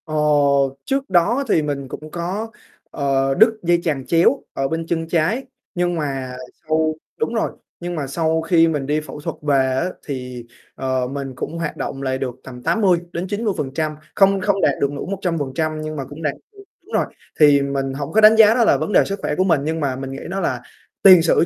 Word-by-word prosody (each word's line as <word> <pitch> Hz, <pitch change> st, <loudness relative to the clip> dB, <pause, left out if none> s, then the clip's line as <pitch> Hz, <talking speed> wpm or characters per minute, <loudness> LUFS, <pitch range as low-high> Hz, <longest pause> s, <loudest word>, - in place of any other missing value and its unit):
Ờ, 155 Hz, -, -5 dB, 0.7 s
trước 270 Hz, 0 st, -1 dB
đó 195 Hz, +9 st, +3 dB
thì 160 Hz, -, +4 dB
mình 140 Hz, -2 st, -3 dB
cũng 155 Hz, +3 st, -9 dB
có, 190 Hz, +6 st, -4 dB, 0.4 s
ờ, 135 Hz, -1 st, +1 dB
đứt 220 Hz, +2 st, +4 dB
dây 175 Hz, 0 st, +3 dB
chằng 140 Hz, -5 st, -1 dB
chéo 170 Hz, -, +3 dB
ở 135 Hz, -, -1 dB
bên 165 Hz, +2 st, -3 dB
chân 165 Hz, -1 st, -1 dB
trái, 175 Hz, +10 st, +1 dB, 0.3 s
nhưng 175 Hz, 0 st, 0 dB
mà 135 Hz, -5 st, -3 dB, 0.3 s
sau 155 Hz, 0 st, +1 dB, 0.2 s
đúng 155 Hz, -, -1 dB
rồi, 225 Hz, -, 0 dB, 0.3 s
nhưng 175 Hz, 0 st, -4 dB
mà 145 Hz, -4 st, -3 dB
sau 160 Hz, +3 st, 0 dB
khi 165 Hz, 0 st, +4 dB
mình 150 Hz, -4 st, -1 dB
đi 150 Hz, +2 st, 0 dB
phẫu 150 Hz, -, -9 dB
thuật 165 Hz, +1 st, -4 dB
về 145 Hz, -2 st, +1 dB, 0.2 s
á 175 Hz, +7 st, 0 dB, 0.2 s
thì, 125 Hz, -4 st, -6 dB, 0.3 s
ờ, 130 Hz, -1 st, -1 dB
mình 135 Hz, 0 st, -5 dB
cũng 160 Hz, +6 st, -5 dB
hoạt 165 Hz, -2 st, -4 dB
động 135 Hz, -, -4 dB
lại 130 Hz, -1 st, -1 dB
được 130 Hz, -3 st, -4 dB
tầm 125 Hz, -2 st, -10 dB
80-90% 175 Hz, -, -1 dB, 0.2 s
không 195 Hz, 0 st, +4 dB
không 195 Hz, 0 st, +1 dB
đạt -, -, +4 dB
được 140 Hz, -, +2 dB
đủ 145 Hz, -, -5 dB
100% 160 Hz, -5 st, -2 dB
nhưng 155 Hz, 0 st, -5 dB
mà 140 Hz, -, -3 dB
cũng 145 Hz, +3 st, -10 dB
đạt 145 Hz, -2 st, 0 dB, 0.2 s
được 400 Hz, -1 st, -14 dB, 0.2 s
đúng 435 Hz, -, -15 dB
rồi, -, -, +2 dB, 0.3 s
thì 145 Hz, -2 st, +6 dB
mình 135 Hz, -1 st, -2 dB
hổng 140 Hz, +2 st, -5 dB
có 220 Hz, -, +4 dB
đánh 215 Hz, +1 st, +8 dB
giá 220 Hz, -1 st, +8 dB
đó 240 Hz, 0 st, +3 dB
là -, -, +4 dB
vấn 210 Hz, -, -3 dB
đề -, -, +5 dB
sức 195 Hz, 0 st, -4 dB
khỏe 150 Hz, -, -1 dB
của 185 Hz, -, +2 dB
mình. 165 Hz, -7 st, +2 dB
Nhưng 160 Hz, +2 st, -2 dB
mà 140 Hz, -4 st, -1 dB
mình 135 Hz, 0 st, -6 dB
nghĩ 135 Hz, -, -6 dB
đó 190 Hz, +2 st, -2 dB
là 130 Hz, -9 st, -1 dB, 0.4 s
tiền 185 Hz, -3 st, +9 dB
sử 165 Hz, 0 st, +3 dB
160 Hz, 215 wpm, -20 LUFS, 140-185 Hz, 0.7 s, tiền